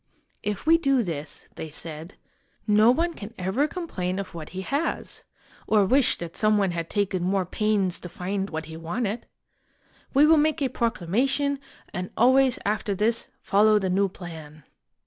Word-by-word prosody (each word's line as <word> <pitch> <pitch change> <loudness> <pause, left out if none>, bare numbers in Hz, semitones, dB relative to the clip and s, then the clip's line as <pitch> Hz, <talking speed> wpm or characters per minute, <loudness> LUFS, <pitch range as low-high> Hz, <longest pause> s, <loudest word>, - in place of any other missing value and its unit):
"If 210 +4 -3
we 330 +1 +5
do 275 -5 +2
this," 155 -5 -6
they 160 - -5
said, 160 +3 -7 0.3
" - - -41
no 210 +2 +5
one 335 +7 +2
can 220 -4 -9
ever 190 +11 0
com 360 +2 -5
plain 185 - -2
of 200 -1 -5
what 160 -2 -7
he 185 - -5
has, 280 - -3 0.4
or 210 -2 +4
wish 260 +4 +3
that 170 -1 -7
some 215 -1 +3
one 195 -3 +2
had 170 -1 -4
taken 195 -3 0
more 185 +1 +1
pains 200 -1 0
to 180 - -8
find 195 +3 -3
what 160 0 -4
he 160 +1 -9
wanted. 200 +7 -3 0.8
We 280 +3 +5
will 320 +1 +6
make 310 +1 +2
a 275 -3 +1
proclamation, 255 - 0 0.3
and 185 0 -4
always 260 +1 +5
after 205 -1 0
this 225 +4 +1 0.2
follow 215 +1 +4
the 190 -3 0
new 195 +1 +2
plan." 160 -5 -10
205 Hz, 175 wpm, -25 LUFS, 180-250 Hz, 0.8 s, will